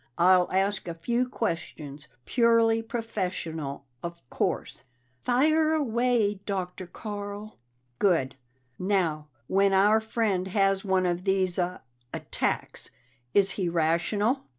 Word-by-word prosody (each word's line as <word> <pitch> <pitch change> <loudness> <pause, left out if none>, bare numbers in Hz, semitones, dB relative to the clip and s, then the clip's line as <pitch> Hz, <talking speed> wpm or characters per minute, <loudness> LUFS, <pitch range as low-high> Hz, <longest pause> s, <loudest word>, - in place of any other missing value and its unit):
"I'll 180 +1 +5
ask 195 +1 0
a 170 - -4
few 240 +9 0
questions 155 - -4 0.2
purely 230 -2 +3
professional, 180 - -4 0.2
of 170 0 -6
course." - - -2 0.4
"Fire 310 +5 +3
away, 235 -7 +1
Dr. 185 -2 -3
Carl." 205 +2 -7 0.4
"Good. 160 -10 +2 0.4
Now, 175 -6 0 0.2
when 195 +5 +3
our 205 +3 +5
friend 220 -4 -1
has 195 0 +2
one 190 -2 +2
of 175 0 -1
these 190 -2 +1
uh 180 0 -1 0.3
attacks, - - -3 0.5
is 195 -1 +5
he 180 -2 -1
rational? 175 - +1
195 Hz, 110 wpm, -27 LUFS, 175-225 Hz, 0.5 s, I'll